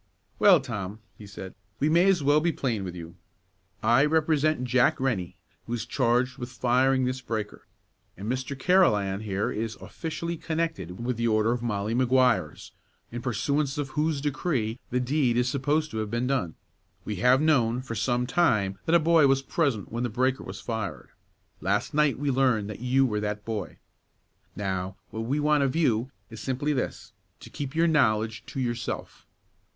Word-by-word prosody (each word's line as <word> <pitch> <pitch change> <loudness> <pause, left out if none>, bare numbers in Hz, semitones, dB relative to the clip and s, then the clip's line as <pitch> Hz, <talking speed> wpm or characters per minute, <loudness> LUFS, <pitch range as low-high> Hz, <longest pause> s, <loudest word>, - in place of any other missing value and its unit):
"Well, - - +7
Tom," 95 +1 -5 0.2
he 105 +1 -12
said, 95 -2 -9 0.3
"we 145 - +2
may 170 +4 +4
as 180 -6 +2
well 145 +2 +4
be 170 +2 +1
plain 120 -9 -2
with 90 -1 -6
you. 85 0 -9 0.7
I 120 +4 +5
represent 155 -2 +2
Jack 125 0 +2
Rennie, 115 -10 -1 0.3
who 120 - -3
is 115 -2 -2
charged 125 +1 +1
with 120 -1 -5
firing 130 +2 +2
this 130 +1 -2
breaker, 110 -3 -5 0.5
and 100 +3 -6
Mr. 130 +3 -3
Carolan 105 - +3
here 105 -2 -2
is 110 +1 -3
officially 170 +1 -5
connected 155 - -3
with 125 -2 -1
the 115 0 0
order 110 0 +2
of 120 0 -1
Molly 105 -2 -2
Maguires, 125 - +2 0.4
in 120 +1 -5
pursuance 140 +4 -1
of 145 -2 -2
whose 150 0 -1
decree 135 -6 -1
the 125 - 0
deed 125 -1 +1
is 125 0 +2
supposed 145 +4 0
to 110 - -5
have 110 -1 -3
been 120 +3 -1
done. 125 - -1 0.5
We 105 - -4
have 125 +5 +4
known, 130 -6 +2
for 120 - -6
some 120 +3 0
time, 115 - +1
that 165 - +4
a - - +7
boy 160 -2 +5
was 135 0 +2
present 135 - -1
when 115 +1 -3
the 120 - -1
breaker 130 +3 0
was - - -8
fired. 100 - -5 0.5
Last - - -1
night 150 -2 +2
we 140 +1 0
learned 125 -6 +1
that 105 - -8
you 130 +2 +2
were 105 -4 -1
that 105 0 -3
boy. 105 -6 -4 0.8
Now, 95 -1 -3 0.2
what 110 - -5
we 140 +5 0
want 150 0 +3
of 135 0 0
you 130 -7 +1 0.2
is 110 - -8
simply 135 +5 -1
this: 130 - -4 0.3
to - - -12
keep 140 0 -5
your 165 +1 +3
knowledge 110 -8 +2
to 135 - -6
yourself. 120 -2 -4
125 Hz, 180 wpm, -27 LUFS, 110-145 Hz, 0.8 s, Well